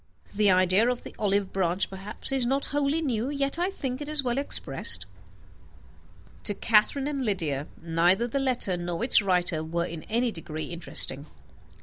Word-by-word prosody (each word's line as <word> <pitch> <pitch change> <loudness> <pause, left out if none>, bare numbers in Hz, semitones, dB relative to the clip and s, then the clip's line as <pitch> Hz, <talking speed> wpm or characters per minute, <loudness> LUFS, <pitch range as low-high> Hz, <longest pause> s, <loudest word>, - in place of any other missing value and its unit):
The 210 0 +2
idea 185 +5 +3
of 250 -1 -3
the - - -10
olive 200 -2 0
branch 185 0 0
perhaps 195 +6 -7
is 265 -3 +1
not 275 +2 0
wholly 290 +3 0
new, 245 -3 -2
yet 280 +2 0
I 360 +2 0
think 270 -8 -5
it 290 - -6
is 305 -2 +3
well 245 +1 -1
expressed." 280 - +2 1.4
To 205 - +1
Catherine 230 +7 +2
and 280 -3 -3
Lydia 160 - -2
neither 170 +7 +1
the 275 +4 -2
letter 250 -9 +1
nor 175 +3 -4
its 240 - +5
writer 180 -4 0
were 170 +2 -2
in 165 -2 -7
any 235 +2 0
degree 160 -4 -7
interesting. 155 -4 +3
210 Hz, 165 wpm, -26 LUFS, 175-265 Hz, 1.4 s, its